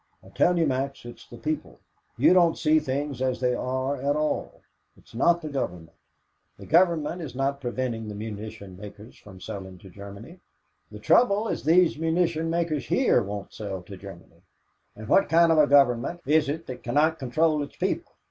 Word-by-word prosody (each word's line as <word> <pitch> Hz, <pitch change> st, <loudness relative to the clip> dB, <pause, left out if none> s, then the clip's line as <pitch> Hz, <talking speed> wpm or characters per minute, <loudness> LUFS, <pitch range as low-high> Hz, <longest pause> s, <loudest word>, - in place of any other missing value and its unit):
"I -, -, -15 dB
tell 180 Hz, 0 st, +2 dB
you, 165 Hz, -, +3 dB
Max, 135 Hz, -1 st, -2 dB
it's 120 Hz, -, -11 dB
the 120 Hz, -, -11 dB
people. 155 Hz, +5 st, -4 dB, 0.4 s
You -, -, +5 dB
don't 170 Hz, -3 st, +4 dB
see 155 Hz, 0 st, +3 dB
things 140 Hz, -2 st, -3 dB
as 130 Hz, -1 st, 0 dB
they 125 Hz, -1 st, +1 dB
are 130 Hz, +3 st, -2 dB
at 140 Hz, +2 st, 0 dB
all 155 Hz, 0 st, -2 dB, 0.4 s
it's -, -, -21 dB
not 170 Hz, +8 st, +2 dB
the 155 Hz, -, -4 dB
Government. 85 Hz, -, -5 dB, 0.6 s
The -, -, -11 dB
Government 170 Hz, 0 st, +2 dB
is 135 Hz, -6 st, -7 dB
not 140 Hz, +1 st, -1 dB
preventing 120 Hz, -3 st, -3 dB
the 105 Hz, -, -6 dB
munition 105 Hz, -2 st, -7 dB
makers 105 Hz, +3 st, -11 dB
from 95 Hz, -3 st, -14 dB
selling 95 Hz, 0 st, -8 dB
to 95 Hz, +1 st, -15 dB
Germany. 100 Hz, -, -11 dB, 0.5 s
The -, -, -9 dB
trouble 220 Hz, -2 st, +3 dB
is -, -, -3 dB
these 165 Hz, 0 st, +3 dB
munition 165 Hz, 0 st, 0 dB
makers 165 Hz, -3 st, -1 dB
here 260 Hz, -, +3 dB
won't 100 Hz, -1 st, -6 dB
sell 95 Hz, -4 st, -6 dB
to 100 Hz, +2 st, -10 dB
Germany." 95 Hz, -2 st, -13 dB, 0.6 s
"But 110 Hz, 0 st, -9 dB
what 195 Hz, -, +3 dB
kind 165 Hz, +1 st, +5 dB
of 160 Hz, -, +4 dB
a 150 Hz, -, +5 dB
government 140 Hz, +3 st, +3 dB
is 150 Hz, 0 st, +3 dB
it 160 Hz, +3 st, -4 dB
that 130 Hz, -, -8 dB
cannot 155 Hz, +6 st, +1 dB
control 155 Hz, +4 st, +1 dB
its 145 Hz, -, -7 dB
people? -, -, -2 dB
135 Hz, 185 wpm, -26 LUFS, 110-160 Hz, 0.6 s, You